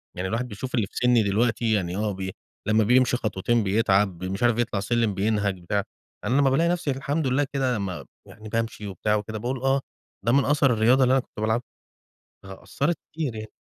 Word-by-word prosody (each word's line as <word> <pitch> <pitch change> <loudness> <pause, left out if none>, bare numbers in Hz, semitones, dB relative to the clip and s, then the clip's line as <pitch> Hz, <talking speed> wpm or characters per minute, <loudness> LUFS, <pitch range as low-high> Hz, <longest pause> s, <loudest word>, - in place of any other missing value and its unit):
يعني 90 +1 -3
الواحد 115 +5 -2
بيشوف 125 +4 -5
اللي 110 -5 +1
في - - -26
سني 125 -2 +4
دلوقتي 110 +3 +1
يعني 90 -4 -1
آه، 105 0 0
بي 95 0 -4 0.4
لمّا 110 +1 +4
بيمشي 125 +3 +3
خطوتين 110 0 0
بيتعب 95 -3 +1
مش 95 +4 -3
عارف 120 -1 +3
يطلع 120 -4 0
السلم 115 +1 +1
بينهج 100 -1 0
بتاع، 100 +3 0 0.4
أنا 130 +3 +2
لمّا 135 - +4
بالاقي 160 +6 +2
نفسي 175 -4 0
الحمد 140 +3 -1
لله 135 +3 +2
كده 130 -3 +1
لمّا 95 -3 -4 0.2
يعني 110 0 -11
بامشي 115 -2 -3
وبتاع 105 +2 -1
وكده 105 +1 -3
باقول 125 +4 -3
آه، 135 +1 +2 0.4
ده 120 - +3
من 140 +2 +4
أثر 140 -3 +3
الرياضة 120 +4 +4
اللي 125 - +3
أنا 135 - +4
كنت - - -14
بالعبها. 110 +3 0 0.8
فأثرت 140 - -3
كتير 150 -7 -3
يعني. 110 0 -7
115 Hz, 200 wpm, -25 LUFS, 100-130 Hz, 0.8 s, سني